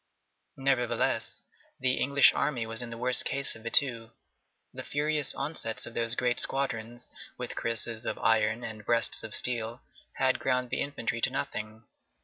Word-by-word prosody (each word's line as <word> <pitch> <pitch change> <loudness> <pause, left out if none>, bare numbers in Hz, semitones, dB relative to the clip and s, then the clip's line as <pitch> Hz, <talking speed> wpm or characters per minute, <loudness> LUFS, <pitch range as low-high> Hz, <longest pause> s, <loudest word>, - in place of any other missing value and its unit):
Nevertheless, 135 -3 -1 0.4
the 130 0 +1
English 140 +1 +5
army 125 -6 -1
was 115 +1 -1
in 120 - -6
the 115 - -8
worse 125 +1 +6
case 140 0 +2
of 110 - -12
the 115 - -5
two. 115 -4 +2 0.6
The - - -7
furious 150 0 -2
onsets 135 -6 -5
of 120 - -10
those 115 0 0
great 120 0 0
squadrons 120 -3 +1 0.3
with - - -6
cuirasses 115 0 -1
of - - -2
iron 110 +1 +1
and 110 -2 -7
breasts 115 +1 +2
of 110 -1 -1
steel 120 0 0 0.3
had 130 0 +1
ground 125 -1 -1
the - - -1
infantry 120 -4 -3
to - - +2
nothing. 110 -4 -5
120 Hz, 160 wpm, -28 LUFS, 115-135 Hz, 0.6 s, worse